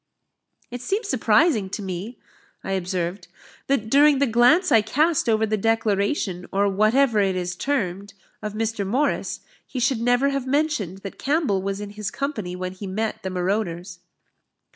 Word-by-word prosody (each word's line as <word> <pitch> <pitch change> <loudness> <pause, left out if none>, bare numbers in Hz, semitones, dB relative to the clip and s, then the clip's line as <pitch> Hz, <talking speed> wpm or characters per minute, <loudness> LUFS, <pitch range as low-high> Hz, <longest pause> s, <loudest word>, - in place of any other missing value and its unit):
"It 245 0 -6
seems 400 - -2
surprising 220 - +2
to 205 - -5
me," 190 +5 -5 0.5
I - - -4
observed, 180 -1 -2 0.4
"that 270 -6 0
during 285 +4 +5
the 280 - +3
glance 260 - +4
I 225 -4 +6
cast 300 +6 +1
over 220 0 +3
the 215 0 -1
declaration, 205 -3 0
or 200 +1 +2
whatever 215 +4 +3
it 195 -2 +2
is 180 0 -3
termed, 200 -5 -2 0.3
of 210 -1 -4
Mr. 220 -1 -2
Morris, 255 +10 -1 0.2
he 260 - -6
should 240 -1 +1
never 245 +3 +3
have 275 -2 -2
mentioned 260 - -1
that 195 - -8
Campbell 280 - +1
was 195 +1 -3
in 205 -1 -6
his 210 -1 -4
company 215 -10 -4
when 185 0 -4
he 190 +2 -8
met 215 +3 -3
the 190 - -4
marauders." 180 -1 -2
215 Hz, 165 wpm, -23 LUFS, 190-260 Hz, 0.5 s, I